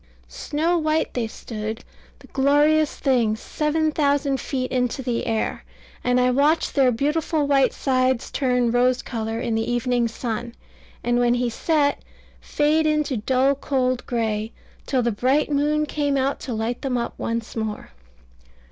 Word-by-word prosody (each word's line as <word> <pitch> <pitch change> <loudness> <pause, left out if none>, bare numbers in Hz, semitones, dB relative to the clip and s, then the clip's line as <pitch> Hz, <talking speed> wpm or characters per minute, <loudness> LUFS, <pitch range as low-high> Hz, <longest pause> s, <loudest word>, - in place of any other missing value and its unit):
Snow 330 +4 -1
white 310 0 0
they 240 -3 -1
stood, 220 0 -6 0.3
the - - -17
glorious 295 +3 +3
things, 230 -5 +1
seven 310 +3 0
thousand 285 -2 +1
feet 255 -2 -3
into 250 +1 -1
the 245 -1 -2
air; 225 -1 -1 0.4
and 250 0 +2
I 250 0 +3
watched 290 +5 +2
their 265 -3 +4
beautiful 300 +4 0
white 275 -2 +3
sides 255 -2 0
turn 250 -3 +1
rose 250 +1 +2
colour 225 -2 -3
in 235 -2 -2
the 225 +2 -1
evening 245 -1 +1
sun, 235 +1 -5 0.5
and 240 0 +1
when 240 0 +3
he 245 -1 0
set, 290 +2 +1 0.4
fade 310 +2 +1
into 300 -3 +1
dull 260 +5 +2
cold 255 -2 -1
gray, 220 -2 -1 0.4
till 260 -3 +1
the 235 - +1
bright 265 +8 +1
moon 300 +1 +1
came 290 -2 -1
out 270 +1 0
to 250 - -5
light 225 +2 -2
them 260 -2 -1
up 235 0 -3
once 230 0 -3
more. 220 - -4
255 Hz, 155 wpm, -23 LUFS, 235-290 Hz, 0.5 s, their